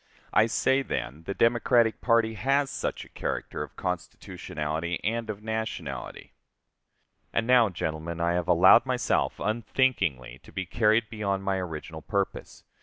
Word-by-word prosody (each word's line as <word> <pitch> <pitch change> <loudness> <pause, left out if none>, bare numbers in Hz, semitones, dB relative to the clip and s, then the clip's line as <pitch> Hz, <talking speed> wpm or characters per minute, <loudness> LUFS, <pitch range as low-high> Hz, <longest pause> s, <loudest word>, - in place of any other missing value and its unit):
I 110 +2 +5
say, 130 +3 +2
then, 75 - -4
the 100 - -3
Democratic 115 -1 +3
party 115 -2 +3
has 135 +6 +1
such - - -3
a - - -18
character - - -4
of - - -7
constitutionality 80 -2 -4
and 115 +1 -1
of 105 0 -5
nationality. 110 - -5 1.0
And 115 - 0
now, 120 -3 +5
gentlemen, 85 -1 -4
I 85 +1 +1
have 90 -1 -1
allowed - - +6
myself - - 0
unthinkingly 110 - 0
to - - -16
be 95 - -4
carried 110 +3 +2
beyond 100 -3 -2
my 95 -1 0
original 80 -3 -6
purpose. 100 +2 -3
105 Hz, 140 wpm, -27 LUFS, 85-115 Hz, 1.0 s, allowed